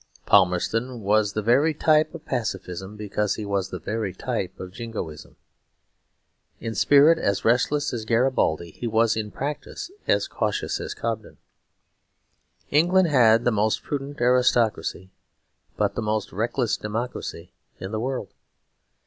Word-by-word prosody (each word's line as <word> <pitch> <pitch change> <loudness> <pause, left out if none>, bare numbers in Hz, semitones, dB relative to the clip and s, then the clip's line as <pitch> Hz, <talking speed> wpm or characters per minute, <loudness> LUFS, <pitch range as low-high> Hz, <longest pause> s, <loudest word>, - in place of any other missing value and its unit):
Palmerston 110 +6 +2
was 105 0 +2
the 110 - -2
very 140 +8 +3
type 155 +1 +3
of 160 -1 -10
Pacifism, 95 - -4
because 105 -1 -1
he 110 - -5
was 100 -2 -1
the 90 - -5
very 100 +3 -3
type 95 -3 -4
of 90 -1 -7
Jingoism. 110 -8 -7 1.2
In 115 - -4
spirit 145 +7 +5
as 100 -8 -1
restless 145 +5 +2
as 115 -2 -3
Garibaldi, 115 -8 +1
he 120 - -5
was 115 0 +2
in 110 -1 -3
practice 145 - -5 0.2
as - - +2
cautious - - -2
as 420 - -5
Cobden. - - -4 1.3
England 175 +4 +4
had 115 -5 +5
the 120 - +4
most 110 0 +1
prudent 145 0 -5
aristocracy, 120 -6 +2 0.7
but - - +1
the - - -3
most 110 0 -2
reckless 115 +3 -1
democracy 105 -6 -5 0.3
in 95 +2 -6
the 110 - -2
world. 125 -3 -3
115 Hz, 135 wpm, -24 LUFS, 100-130 Hz, 1.3 s, spirit